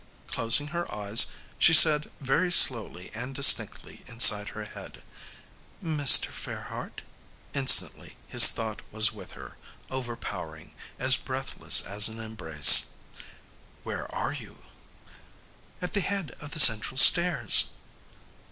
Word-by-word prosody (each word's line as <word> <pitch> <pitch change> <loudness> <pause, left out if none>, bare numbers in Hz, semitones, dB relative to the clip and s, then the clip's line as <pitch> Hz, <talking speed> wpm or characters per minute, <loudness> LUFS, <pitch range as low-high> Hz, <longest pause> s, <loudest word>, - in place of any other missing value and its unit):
Closing 120 +6 -4
her 175 +1 -10
eyes, 105 +2 -1 0.3
she 160 - 0
said 150 -1 +4
very 145 +7 -6
slowly 110 - +1
and 120 +4 -12
distinctly 140 - -1
inside 105 -3 +2
her 105 0 -14
head, 105 - -18 0.8
"Mr. 150 -5 +2
Fairheart?" - - -14 0.5
Instantly 135 -2 +1
his - - +5
thought 110 -2 -10
was 110 0 -1
with 100 -4 -17
her, - - -18 0.3
overpowering, 105 -11 -13 0.2
as - - -1
breathless - - -2
as 105 +2 -1
an 110 +1 -14
embrace. 95 -10 +3 1.0
"Where - - -12
are - - -9
you?" - - -17 1.2
"At 180 - -10
the 200 - -3
head 195 -3 -9
of 145 - -14
the 155 - -7
central 115 0 +3
stairs." 170 - +3
120 Hz, 115 wpm, -21 LUFS, 105-150 Hz, 1.2 s, his